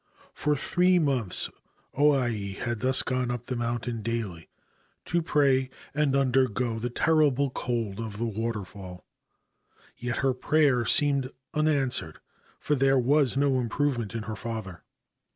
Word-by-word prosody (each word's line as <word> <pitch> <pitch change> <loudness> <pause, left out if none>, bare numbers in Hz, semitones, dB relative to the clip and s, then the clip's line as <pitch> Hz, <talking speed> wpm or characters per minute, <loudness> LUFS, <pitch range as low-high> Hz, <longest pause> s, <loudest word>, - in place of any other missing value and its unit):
For 150 0 0
three 180 +5 +3
months 135 - +1 0.5
O 145 +1 +4
Ai 110 -7 -1
had 120 +3 -3
thus 130 +2 +2
gone 130 -1 -1
up 120 -1 -4
the 125 - -3
mountain 120 -1 -2
daily 105 -7 -4 0.6
to 170 0 0
pray 135 -5 +2 0.2
and 145 -2 +1
undergo 125 -3 +1
the 120 +2 -2
terrible 140 -1 +2
cold 115 -6 -3
of 110 -3 -5
the 115 - -1
water 115 -1 -2
fall; 90 -1 -10 0.9
yet 120 0 -3
her 135 - +3
prayer 135 -3 +2
seemed 140 -3 +3 0.2
unanswered, 150 -4 0 0.4
for 150 - -1
there 135 -1 +3
was 135 +1 +2
no 135 -2 +2
improvement 120 -2 -1
in 115 - -3
her 110 0 -5
father. 105 -5 -6
125 Hz, 140 wpm, -27 LUFS, 115-140 Hz, 0.9 s, O